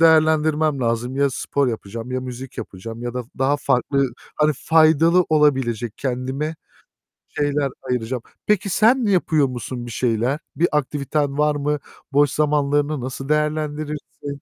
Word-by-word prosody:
değerlendirmem 155 -2 +4
lazım. 120 +2 -1
Ya, 140 -1 +3
spor 140 +1 0
yapacağım, 115 +2 -5
ya 130 - -1
müzik 130 0 -8
yapacağım 115 +5 -7
ya 120 0 -4
da 125 - -2 0.2
daha 135 +2 +2
farklı, 135 -1 +1 0.2
hani 150 0 +3
faydalı 160 +3 +4
olabilecek 130 -7 +1
kendime 135 +5 -2 0.7
şeyler 145 -1 0
ayıracağım. 125 -1 -2 0.2
Peki 205 -1 +1
sen 230 +6 +4
yapıyor 160 -7 +3
musun 120 0 -5
bir 120 - -7
şeyler? 120 +4 0 0.2
Bir 175 +2 +3
aktiviten 145 0 -1
var 150 0 +2
mı? 145 +1 -1 0.3
Boş 145 0 +4
zamanlarını 145 -1 +1
nasıl 135 +2 -5
değerlendirirsin? 150 -2 -2
140 Hz, 135 wpm, -21 LUFS, 125-150 Hz, 0.7 s, değerlendirmem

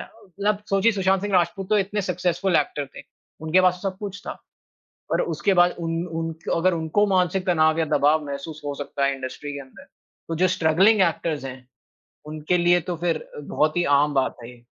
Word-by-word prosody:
है। - - -9 0.2
मतलब 200 +2 -2
सोचिए 195 +4 +3
सुशांत 190 -1 +1
सिंह 205 -1 -3
राजपूत 180 +2 +1
तो 215 - +4
इतने 205 +1 -1
सक्सेसफुल 180 0 0
एक्टर 145 -1 -1
थे, - - -8 0.4
उनके 160 +4 +3
पास 180 -1 +2
सब 195 -2 -3
कुछ 200 -1 -6
था। - - -6 0.7
और - - +2
उसके 170 +4 0
बाद 175 -1 +4
उन 165 0 -2
उन 165 0 -2 0.2
अगर 180 +2 +2
उनको 165 +5 +1
मानसिक 185 -1 +1
तनाव 160 -2 +3
या 165 - +2
दबाव 150 0 +2
महसूस 145 +2 -7
हो 145 - -2
सकता 140 -1 -2
है, 140 - +1
इंडस्ट्री 135 +2 -6
के 140 - -6
अंदर, 130 -1 -15 0.4
तो 165 - -3
जो 185 +3 +3
स्ट्रगलिंग 185 +5 +3
एक्टर्स 165 -4 0
हैं 130 -1 -9 0.6
उनके 155 +3 -1
लिए 175 0 +4
तो 175 - -2
फिर 170 0 -2
बहुत 150 +2 0
ही 175 - +2
आम 145 0 +1
बात 135 -1 0
है 115 - -9
ये। 120 -1 -17
170 Hz, 200 wpm, -23 LUFS, 150-185 Hz, 0.7 s, तो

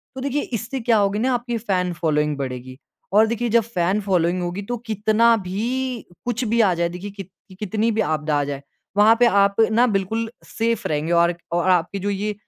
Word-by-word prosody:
तो 265 - -6
देखिए 280 +1 -1 0.2
इससे 235 +5 -5
क्या 230 -2 +2
होगी 200 +1 +1
न 240 - 0
आपकी 240 -2 -1
फैन 185 -5 -1
फॉलोइंग 150 -3 0
बढ़ेगी। 130 -1 -6 0.4
और 215 +2 +6
देखिए 235 +1 -1
जब 230 +1 +4
फैन 195 -2 0
फॉलोइंग 180 -2 +1
होगी 175 +3 -3
तो 245 - -1
कितना 220 +2 +3
भी, 235 +6 -3 0.2
कुछ 245 0 -1
भी 230 +2 +2
आ 190 -4 +3
जाए 170 0 0
देखिए 180 +4 -7
कित 195 -2 -9 0.3
कितनी 215 +2 0
भी 220 0 0
आपदा 155 -3 -1
आ 145 - +1
जाए। 140 -1 -5 0.4
वहाँ 215 +2 +6
पे 245 - +6
आप 200 -3 +3 0.2
न 235 +3 +4
बिल्कुल 220 +4 -1
सेफ़ 230 -1 -2
रहेंगे 155 +2 -2
और 170 0 +4
एक 175 - -4 0.2
और 175 +2 +1
आपकी 180 +2 +1
जो 205 +2 -2
ये 205 +1 -2
200 Hz, 205 wpm, -22 LUFS, 175-230 Hz, 0.4 s, और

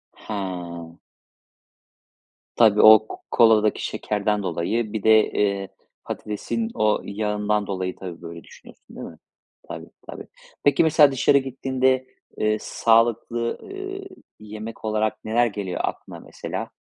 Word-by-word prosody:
He. 85 -5 -6 1.6
Tabii. 110 -3 +5
O 110 0 +8
k - - -8 0.2
koladaki 110 -2 +4
şekerden 105 0 -2
dolayı 105 +6 -2
bir 110 -3 -3
de, 110 -1 +5
eee, 100 -1 0 0.4
patatesin 225 - -4
o 110 0 +1
yağından 105 0 -1
dolayı, 95 -2 -3
tabii, 90 -3 -9
böyle 85 -1 -9
düşünüyorsun - - -17
değil - - -7
mi? - - -13 0.5
Tabii, - - -8 0.2
tabii. - - -8 0.4
Peki, 145 +2 +4
mesela 155 -3 +5
dışarı 135 +1 +3
gittiğinde, 130 -1 0 0.3
eee, 110 0 +1
sağlıklı, 115 +1 +1
eee, 390 0 -7 0.3
yemek 110 +1 -9
olarak 110 0 -1
neler 115 +2 +2
geliyor 100 -5 -4
aklına, - - -5
mesela? - - -7
110 Hz, 120 wpm, -23 LUFS, 100-120 Hz, 1.6 s, O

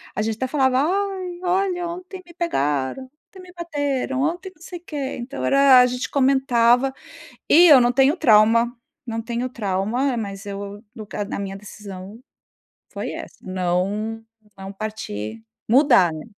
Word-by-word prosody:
a - - -1
gente 220 0 -1
até 260 +4 -3
falava: 265 -2 +2
"Ai, 370 +1 -2
olha, 360 -1 0
ontem 365 +2 -8
me 345 - -16
pegaram, 145 - -1
ontem 300 +7 -18
me 360 -1 -14
bateram, 285 -6 -2
ontem 350 +6 -2
não 310 - -29
sei 350 +1 -8
o - - -34
quê", 280 -4 -4
então, 250 +3 -5
era 275 -2 +6
a 250 - +7
gente 250 0 -3
comentava 265 -2 +3 0.5
e 345 +3 +7
eu 290 -5 +9
não 240 0 +3
tenho 270 +6 +3
trauma, 230 -1 +4 0.3
não 225 -2 -4
tenho 235 +2 -3
trauma, 235 +3 -1
mas 200 -2 -6
eu 200 +1 -7
nunca 210 -2 -7
a 205 - -4
minha 195 -1 -5
decisão 200 0 -10 0.7
foi - - -4
essa, - - -8
não 190 +5 -2 0.3
não 195 0 -8
partir 110 - -6 0.2
mudar, 240 - +5
né? 155 - -8
250 Hz, 155 wpm, -22 LUFS, 205-300 Hz, 0.7 s, eu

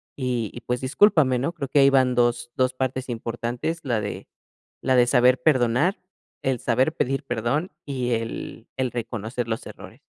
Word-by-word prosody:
y 125 -5 -2
y 120 - -8
pues, 125 +1 -2
discúlpame, 135 -3 +4
¿no? 140 +7 -1
Creo 140 -6 -5
que 140 - +3
ahí 135 - +7
van 130 -2 +4
dos-dos 120 +1 +1
partes 130 0 -2
importantes, 120 +6 -3
la 120 -5 0
de 105 - -6 0.5
la 130 - +2
de 120 0 +5
saber 125 0 +4
perdonar, 140 - +2 0.4
el 130 -2 0
saber 130 +7 +1
pedir 135 -1 -1
perdón 120 - -1
y 130 -3 -2
el 115 0 -5
el 130 -2 0
reconocer 115 0 -4
los 110 - -3
errores. - - -12
125 Hz, 165 wpm, -24 LUFS, 120-135 Hz, 0.5 s, ahí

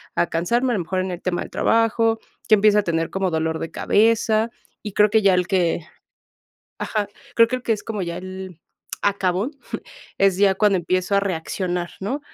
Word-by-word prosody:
a - - +2
cansarme. 235 +10 0
A - - +1
lo - - -1
mejor 185 +2 -1
en 185 0 -3
el 175 - -6
tema 180 -1 -1
del - - -7
trabajo. 225 0 +2 0.3
Que 215 - +7
empiezo 210 0 +4
a - - 0
tener 165 -2 -1
como 190 -1 -1
dolor 160 0 -1
de 165 - -5
cabeza, 220 +1 +2 0.4
y 200 - -6
creo 210 0 +4
que 220 -1 +3
ya 195 -2 +5
el 180 0 +1
que 180 -4 +1 1.0
Ajá, 210 -2 -2 0.3
creo 230 0 +6
que 255 - -1
el 250 - -12
que 230 - 0
es 210 - -6
como 210 -4 -3
ya 170 0 -4
el 185 -2 -8 0.4
acabón, 195 - 0 0.7
es 195 -2 +4
ya 195 0 +4
cuando 200 -1 +3
empiezo 185 +3 0
a - - +4
reaccionar, 180 -1 -2
¿no? 255 +10 -3
195 Hz, 200 wpm, -22 LUFS, 180-215 Hz, 1.0 s, Que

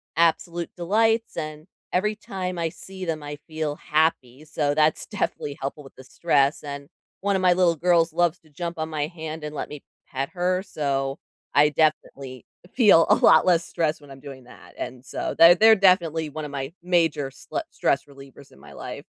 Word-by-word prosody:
absolute 170 +1 +1
delights 225 +6 +1
and 155 -1 -6 0.3
every 210 +4 +1
time 185 -4 -5
I 165 -1 -1
see 190 +2 -9
them, 160 -2 -3
I 145 0 -6
feel 155 -2 -3
happy, 150 -3 -1
so 150 -1 -1
that's 155 0 +2
definitely 145 -8 -3
helpful 140 +2 -5
with 135 - -16
the 130 - -13
stress, 140 0 +1
and 140 -1 -7 0.3
one 200 0 +1
of 190 - 0
my 180 -1 +5
little 175 -2 +3
girls 170 0 +2
loves 175 0 +1
to 155 - -25
jump 170 +3 -6
on 160 - -3
my 150 -2 -2
hand 160 -2 -7
and 150 0 -6
let - - -5
me 150 -1 -9 0.2
pet 135 +1 -4
her, 185 +1 0
so 135 -5 -2 0.4
I 150 +1 +5
definitely 140 -4 -1 0.3
feel 205 -9 +5
a - - +7
lot 160 - +5
less 170 -2 +3
stress 160 -3 -1
when 145 -2 -16
I'm 135 - -11
doing 135 -2 -10
that, - - -16
and, 125 0 -6
so - - -4
they're 170 +1 +8
they're 220 +3 +7
definitely 170 -5 +2
one 155 +1 -6
of 145 - -8
my 135 +1 -5
major 165 -6 +1
sle 340 - -5
stress 140 0 0
relievers 140 -1 -15
in - - -19
my - - -14
life. - - -8
155 Hz, 195 wpm, -24 LUFS, 145-175 Hz, 0.4 s, they're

